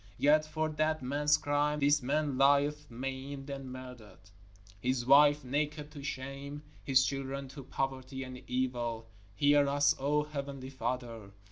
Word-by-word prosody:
Yet 155 +2 +4
for 155 0 -1
that 155 -1 0
man's 145 +3 +2
crime 145 0 0
this 145 +1 +3
man 145 +2 0
lieth 145 +2 +3
maimed 135 +3 -5
and 135 -2 -6
murdered, 115 -7 -11 0.5
his 125 +1 -1
wife 145 +2 +6
naked 150 +3 -2
to 145 -2 -9
shame, 140 +2 -6 0.2
his 130 -1 +4
children, 135 0 -3
to 140 0 -9
poverty 130 0 -3
and 130 -1 -8
evil. 120 -3 -2 0.3
_Hear 145 0 +5
us, 145 +1 +3
O 145 +2 +1
Heavenly 140 -3 -6
Father! 120 -5 -4
140 Hz, 140 wpm, -32 LUFS, 130-145 Hz, 0.5 s, wife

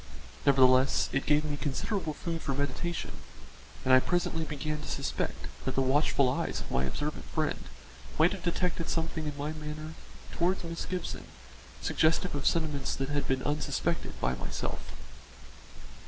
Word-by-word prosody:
Nevertheless, 130 -1 +6
it 135 - 0
gave 150 +1 +4
me 145 -1 -2
considerable 155 +3 -1
food 165 -2 -3
for 135 - -1
meditation, 145 +5 -2 0.7
and 130 - +5
I 130 - +10
presently 165 +2 0
began 150 0 -3
to - - -7
suspect 140 -1 -2 0.2
that 130 - -2
the 135 - +3
watchful 140 0 +3
eyes 125 - 0
of - - -7
my 65 +1 +2
observant 150 - -3
friend 155 -2 -1 0.5
might - - +6
have - - -4
detected 175 -1 0
something 160 -1 -1
in 145 -1 -4
my 145 +2 -2
manner 155 0 -6 0.4
towards 180 +2 +1
Miss 165 0 -4
Gibson 180 -2 -3 0.6
suggestive 165 +3 +2
of 145 -1 0
sentiments 155 -4 +1
that 135 +1 -2
had 145 -1 0
been 130 0 +1
unsuspected 150 +3 -1
by - - +1
myself. 65 - -3
150 Hz, 155 wpm, -30 LUFS, 135-165 Hz, 0.7 s, I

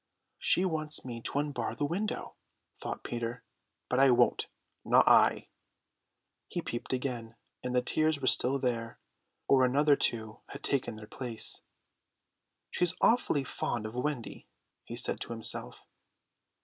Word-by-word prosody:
"She 185 - +3
wants 155 -5 -1
me 120 -2 -6
to 135 - -3
unbar 140 -6 -2
the 145 - -1
window," 190 +8 -3 0.4
thought - - -6
Peter, 120 0 -4 0.4
"but 125 - +1
I 135 0 +7
won't, 120 - +3 0.4
not - - +4
I!" - - +5 1.0
He - - -4
peeped 120 - -5
again, 125 -3 -3 0.3
and 125 0 -2
the 125 - +3
tears 155 +3 +1
were 130 - -4
still 130 +1 +3
there, 115 -3 -2 0.5
or 135 -1 +5
another 145 +3 +4
two 110 -4 -2
had 140 - -10
taken 135 -5 -1
their 110 0 -9
place. 115 -1 0 1.1
"She's 180 0 +1
awfully 220 - +3
fond 120 -3 -3
of 110 - -5
Wendy," 125 -1 -4 0.4
he - - -7
said - - -1
to 120 - -5
himself. 110 - -1
125 Hz, 140 wpm, -31 LUFS, 115-145 Hz, 1.1 s, I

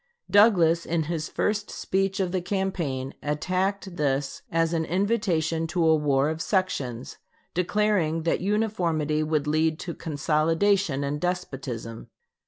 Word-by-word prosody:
Douglas 175 -6 +5
in 165 -1 0
his 155 -1 -3
first 210 0 -1
speech 195 +1 -1
of 185 -2 0
the 185 -1 -1
campaign 175 -9 -2
attacked 185 +5 -2
this 135 -2 -1
as 165 0 +1
an 165 -1 +1
invitation 175 -4 0
to 165 +1 0
a 160 0 +5
war 145 -1 +2
of 160 0 -4
sections, 140 - -2 0.3
declaring 180 -3 +1
that 165 - 0
uniformity 175 -7 0
would 155 -1 0
lead 155 +1 +1
to 170 - -5
consolidation 160 +2 +1
and 145 +1 -2
despotism. 135 -10 -4
165 Hz, 130 wpm, -26 LUFS, 150-190 Hz, 0.3 s, Douglas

